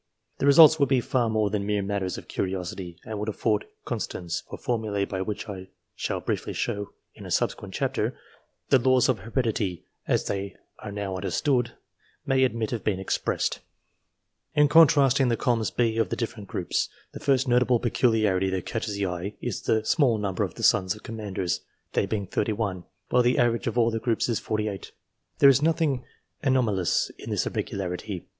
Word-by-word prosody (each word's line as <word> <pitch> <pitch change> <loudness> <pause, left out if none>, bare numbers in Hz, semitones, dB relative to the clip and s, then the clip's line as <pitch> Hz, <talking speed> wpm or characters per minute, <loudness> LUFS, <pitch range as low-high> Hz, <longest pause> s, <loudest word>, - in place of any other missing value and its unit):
The 140 - +1
results 155 +2 +8
would 140 -3 +3
be 135 -2 +4
far 120 -1 0
more 110 -2 +1
than 105 -2 -1
mere 105 0 0
matters 95 -2 -2
of - - -10
curiosity; 90 -2 -4
they 110 - -6
would 105 +1 -3
afford 105 0 0 0.2
constants 85 -2 -3
for - - -6
formulae 110 -4 -1
by 95 -1 -4
which, 105 +1 -3
as - - -13
I 95 -2 -7 0.3
shall - - -2
briefly - - -3
show 100 0 -2 0.2
in - - -12
a - - -8
subsequent - - -1
chapter, - - -1 0.5
the 135 - +6
laws 130 +1 +3
of 125 - +1
heredityN 110 - -2 0.2
as - - +1
they 100 -1 -3 0.2
are - - -7
now 100 -2 -3
understood, 120 +5 0 0.5
may 135 -1 +3
admit 115 -2 0
of 115 - -3
being 105 -3 0
expressedf 95 - -1 1.0
In 150 0 +6
contrasting 140 -4 +5
the 115 -1 +1
columns 115 -3 +1
B 115 -2 0
of 115 - +1
the - - -1
different 110 -3 -5
groups, 90 - -1 0.2
the - - -8
first 135 -1 +2
notable 125 0 +3
peculiarity 110 -6 +2
that 95 -1 -2
catches 110 -3 -3
the 100 0 -1
eye 90 +2 -4
is 120 -5 -3
the 110 -1 +1
small 130 -6 +3
number 100 -3 -2
of - - -4
the - - -7
sons 95 +2 +3
of 105 - -15
Commanders; 100 -6 -3 0.3
they - - +1
being 105 -3 -2
31, 105 -4 -2 0.2
while 125 - +4
the 125 +1 +2
average 120 -4 +2
of - - -2
all 115 -1 +4
the 115 - -1
groups 115 -1 0
is 115 -3 0
48. 105 -2 -3 0.4
There 140 - +7
is 135 0 +6
nothing 155 -5 +1 0.4
anomalous 115 -10 +1
in - - -8
this - - 0
irregularity. 95 0 -4
110 Hz, 185 wpm, -26 LUFS, 100-125 Hz, 1.0 s, results